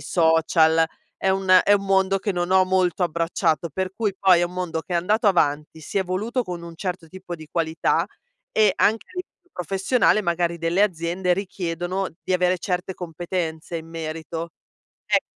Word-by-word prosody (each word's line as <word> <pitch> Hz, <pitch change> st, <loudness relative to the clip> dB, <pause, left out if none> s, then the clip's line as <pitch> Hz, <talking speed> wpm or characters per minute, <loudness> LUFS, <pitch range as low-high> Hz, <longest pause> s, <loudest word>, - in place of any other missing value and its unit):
social, 160 Hz, +1 st, +3 dB, 0.4 s
è 190 Hz, -, 0 dB
un 190 Hz, -1 st, +5 dB
è 205 Hz, -, +5 dB
un 200 Hz, -1 st, 0 dB
mondo 195 Hz, 0 st, +2 dB
che 200 Hz, +1 st, -2 dB
non 175 Hz, 0 st, -2 dB
ho 185 Hz, 0 st, +5 dB
molto 185 Hz, -1 st, +1 dB
abbracciato, 165 Hz, -1 st, 0 dB
per 185 Hz, +4 st, -3 dB
cui 210 Hz, -2 st, -1 dB
poi 185 Hz, -3 st, +5 dB
è -, -, +1 dB
un 175 Hz, +1 st, -6 dB
mondo 180 Hz, -3 st, -2 dB
che 175 Hz, -, -6 dB
è -, -, +4 dB
andato 210 Hz, +7 st, +1 dB
avanti, 150 Hz, -4 st, +1 dB
si 180 Hz, -, -3 dB
è -, -, +3 dB
evoluto 205 Hz, +7 st, -1 dB
con 175 Hz, -3 st, -6 dB
un 170 Hz, 0 st, -9 dB
certo 180 Hz, -2 st, -4 dB
tipo 185 Hz, +1 st, -8 dB
di 155 Hz, -2 st, -10 dB
qualità, 160 Hz, -1 st, 0 dB, 0.4 s
e 215 Hz, -3 st, +4 dB
anche 220 Hz, +2 st, +2 dB
a -, -, -20 dB
livello 360 Hz, -1 st, -9 dB
professionale 195 Hz, +6 st, +2 dB
magari 170 Hz, -1 st, 0 dB
delle 170 Hz, +4 st, +1 dB
aziende 180 Hz, -1 st, 0 dB
richiedono 185 Hz, 0 st, -3 dB, 0.2 s
di -, -, -1 dB
avere 180 Hz, 0 st, +2 dB
certe 180 Hz, +1 st, -2 dB
competenze 170 Hz, -1 st, -4 dB
in 160 Hz, 0 st, -7 dB
merito. 165 Hz, 0 st, -5 dB, 0.6 s
Ecco, -, -, +2 dB
180 Hz, 180 wpm, -23 LUFS, 165-190 Hz, 0.6 s, un